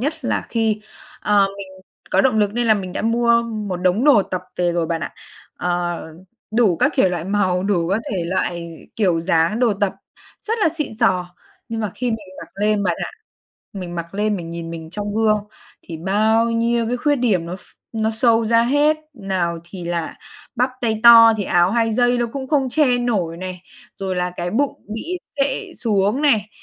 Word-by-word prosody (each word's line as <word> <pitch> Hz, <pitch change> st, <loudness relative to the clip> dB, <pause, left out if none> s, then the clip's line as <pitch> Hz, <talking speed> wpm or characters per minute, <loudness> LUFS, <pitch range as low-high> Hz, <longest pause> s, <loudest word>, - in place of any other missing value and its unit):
nhất 290 Hz, +6 st, -1 dB
là -, -, -1 dB
khi 220 Hz, -2 st, 0 dB, 0.4 s
ờ, 205 Hz, -1 st, +3 dB
mình 200 Hz, -, -7 dB, 0.4 s
có -, -, +4 dB
động 255 Hz, -5 st, +2 dB
lực 205 Hz, -1 st, +2 dB
nên 240 Hz, 0 st, 0 dB
là 220 Hz, -, +5 dB
mình 190 Hz, -3 st, -4 dB
đã -, -, -3 dB
mua 235 Hz, +1 st, +3 dB
một 215 Hz, -5 st, -4 dB
đống 185 Hz, +6 st, +1 dB
đồ 275 Hz, -9 st, +6 dB
tập 185 Hz, -1 st, -4 dB
về 175 Hz, -1 st, +1 dB
rồi 170 Hz, -1 st, 0 dB
bạn 165 Hz, 0 st, -2 dB
ạ, -, -, -5 dB, 0.4 s
ờ, 175 Hz, -1 st, -2 dB, 0.5 s
đủ 220 Hz, -6 st, +3 dB
các -, -, +2 dB
kiểu -, -, +4 dB
loại 175 Hz, -2 st, -3 dB
màu, 190 Hz, -2 st, +1 dB
đủ 185 Hz, -4 st, 0 dB
các 195 Hz, +4 st, +1 dB
thể 185 Hz, -4 st, -2 dB
loại 170 Hz, -2 st, -3 dB, 0.2 s
kiểu 180 Hz, -6 st, +2 dB
dáng 165 Hz, +4 st, +1 dB
đồ 240 Hz, -3 st, +3 dB
tập, 205 Hz, -2 st, +2 dB, 0.5 s
rất 455 Hz, +1 st, -2 dB
là 415 Hz, -, +3 dB
xịn 300 Hz, -8 st, -4 dB
xò. 180 Hz, -6 st, +1 dB, 0.3 s
Nhưng 225 Hz, -1 st, -3 dB
mà 210 Hz, -3 st, -2 dB
khi 250 Hz, -, -3 dB
mình 220 Hz, -4 st, -4 dB
mặc -, -, -10 dB
lên 210 Hz, 0 st, +2 dB
bạn 180 Hz, -3 st, 0 dB
ạ, -, -, -6 dB, 0.6 s
mình 180 Hz, -3 st, -6 dB
mặc 170 Hz, +1 st, -6 dB
lên 210 Hz, +1 st, 0 dB
mình 170 Hz, -3 st, -7 dB
nhìn 170 Hz, 0 st, -6 dB
mình 160 Hz, -1 st, -8 dB
trong 205 Hz, +2 st, -4 dB
gương, 215 Hz, -1 st, +3 dB, 0.4 s
thì 165 Hz, -, -8 dB
bao 215 Hz, +6 st, +2 dB
nhiêu 230 Hz, 0 st, +1 dB
cái 245 Hz, -, 0 dB
khuyết 290 Hz, +4 st, +1 dB
điểm 210 Hz, -10 st, +1 dB
nó 180 Hz, +2 st, -5 dB
ph -, -, -19 dB, 0.4 s
nó 220 Hz, 0 st, +1 dB
show 225 Hz, 0 st, +2 dB
ra 230 Hz, +1 st, +4 dB
hết, 290 Hz, +5 st, +3 dB, 0.2 s
nào 190 Hz, -6 st, -2 dB
thì 175 Hz, 0 st, -9 dB
là 170 Hz, -1 st, -3 dB, 0.4 s
bắp 250 Hz, +2 st, +2 dB
tay 220 Hz, -2 st, -1 dB
to 230 Hz, -1 st, +9 dB
thì 200 Hz, -, -1 dB
áo 175 Hz, 0 st, +3 dB
hai 225 Hz, 0 st, +1 dB
dây 245 Hz, +2 st, +2 dB
nó 240 Hz, -, +1 dB
cũng 270 Hz, -2 st, -5 dB
không 275 Hz, -3 st, +2 dB
che 255 Hz, -4 st, +3 dB
nổi 200 Hz, -9 st, -1 dB
này, 185 Hz, 0 st, -7 dB, 0.4 s
rồi 190 Hz, -1 st, -3 dB
là 180 Hz, 0 st, -1 dB
cái 175 Hz, 0 st, -4 dB
bụng 275 Hz, +7 st, -1 dB
bị 340 Hz, +11 st, -4 dB, 0.2 s
xệ 350 Hz, +7 st, -1 dB
xuống 210 Hz, +3 st, +1 dB
này, 220 Hz, -8 st, +3 dB
210 Hz, 205 wpm, -20 LUFS, 180-235 Hz, 0.6 s, to